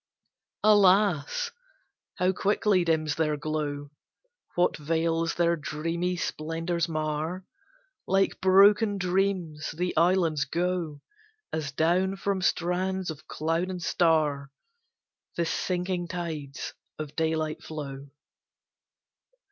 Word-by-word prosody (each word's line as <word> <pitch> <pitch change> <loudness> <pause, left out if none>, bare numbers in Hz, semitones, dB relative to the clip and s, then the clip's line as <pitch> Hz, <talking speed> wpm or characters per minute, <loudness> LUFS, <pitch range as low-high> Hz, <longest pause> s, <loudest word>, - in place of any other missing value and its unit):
Alas! 205 - +4 0.6
how 180 +1 +2
quickly 195 0 +2
dims 160 -2 +1
their 155 -2 0
glow! 145 -1 -3 0.6
What 175 0 +2
veils 165 +2 0
their 170 0 +3
dreamy 165 +4 -2
splendours 165 +1 -2
mar! 155 +3 -2 0.6
Like 195 0 +1
broken 200 +3 +5
dreams 180 -4 -1
the 180 +1 -1
islands 165 -4 +3
go, 170 -1 -2 0.5
As 155 -3 -2
down 175 +6 +2
from 195 -1 -1
strands 185 0 0
of 155 -1 -11
cloud 165 +4 -1
and 185 -1 -4
star, 155 -5 +1 0.9
The 170 - +1
sinking 180 +1 -1
tides 160 -6 -5 0.2
of 155 -2 -6
daylight 160 -1 -1
flow. 140 -3 -7
170 Hz, 100 wpm, -27 LUFS, 155-185 Hz, 0.9 s, broken